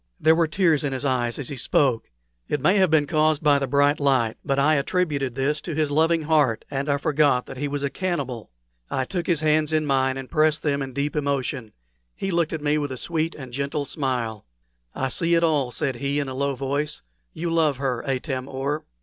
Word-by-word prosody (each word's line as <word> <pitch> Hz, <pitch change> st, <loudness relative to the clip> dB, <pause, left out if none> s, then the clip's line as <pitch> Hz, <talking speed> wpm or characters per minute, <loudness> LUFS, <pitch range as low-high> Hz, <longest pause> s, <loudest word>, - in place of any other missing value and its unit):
There 160 Hz, -, +5 dB
were 165 Hz, 0 st, +2 dB
tears 160 Hz, -3 st, +2 dB
in 140 Hz, -2 st, -1 dB
his 130 Hz, +2 st, -3 dB
eyes 125 Hz, -3 st, 0 dB
as 145 Hz, -, -4 dB
he 140 Hz, -, -5 dB
spoke. 130 Hz, -1 st, +1 dB, 0.4 s
It 150 Hz, -, 0 dB
may 185 Hz, +9 st, +3 dB
have 190 Hz, -2 st, +4 dB
been 155 Hz, -2 st, +3 dB
caused 155 Hz, 0 st, +1 dB
by 145 Hz, -2 st, +4 dB
the 135 Hz, -, -2 dB
bright 145 Hz, +1 st, +3 dB
light, 130 Hz, -6 st, +2 dB
but 135 Hz, -1 st, 0 dB
I 145 Hz, +3 st, +4 dB
attributed 140 Hz, -4 st, 0 dB
this 145 Hz, +3 st, 0 dB
to 165 Hz, -, -5 dB
his 155 Hz, -1 st, 0 dB
loving 160 Hz, +2 st, +2 dB
heart, 150 Hz, -7 st, +2 dB
and 140 Hz, +1 st, -2 dB
I 140 Hz, -, +2 dB
forgot 145 Hz, -3 st, +2 dB
that -, -, -9 dB
he 145 Hz, +2 st, -2 dB
was 145 Hz, 0 st, -3 dB
a 140 Hz, -, 0 dB
cannibal. 140 Hz, -, -3 dB, 0.4 s
I 130 Hz, -, -1 dB
took 175 Hz, +3 st, -4 dB
his 165 Hz, -4 st, +1 dB
hands 155 Hz, 0 st, +2 dB
in 155 Hz, -1 st, +1 dB
mine 130 Hz, -2 st, +1 dB
and 135 Hz, -1 st, -6 dB
pressed 155 Hz, +1 st, +2 dB
them 140 Hz, -2 st, 0 dB
in 135 Hz, -1 st, -5 dB
deep 140 Hz, +3 st, -2 dB
emotion. 140 Hz, -5 st, -2 dB, 0.4 s
He 195 Hz, -, -3 dB
looked 170 Hz, -2 st, +1 dB
at 160 Hz, -2 st, -4 dB
me 150 Hz, +1 st, +2 dB
with 145 Hz, -2 st, -3 dB
a 130 Hz, -, -5 dB
sweet 165 Hz, +3 st, -2 dB
and 130 Hz, -4 st, -9 dB
gentle 140 Hz, +2 st, -2 dB
smile. 125 Hz, -8 st, -3 dB, 0.5 s
"I 135 Hz, -, -1 dB
see 170 Hz, +5 st, +1 dB
it 165 Hz, -, +2 dB
all," 150 Hz, -6 st, +2 dB
said 135 Hz, -1 st, -2 dB
he, 140 Hz, +3 st, -1 dB
in 140 Hz, -, -2 dB
a 130 Hz, -, -5 dB
low 140 Hz, +1 st, -1 dB
voice 140 Hz, +3 st, -2 dB, 0.3 s
"you 170 Hz, +1 st, -3 dB
love 155 Hz, -4 st, +2 dB
her, 130 Hz, -3 st, -2 dB
Atam 130 Hz, -1 st, -3 dB
or." 140 Hz, +3 st, -3 dB
145 Hz, 225 wpm, -24 LUFS, 135-155 Hz, 0.5 s, There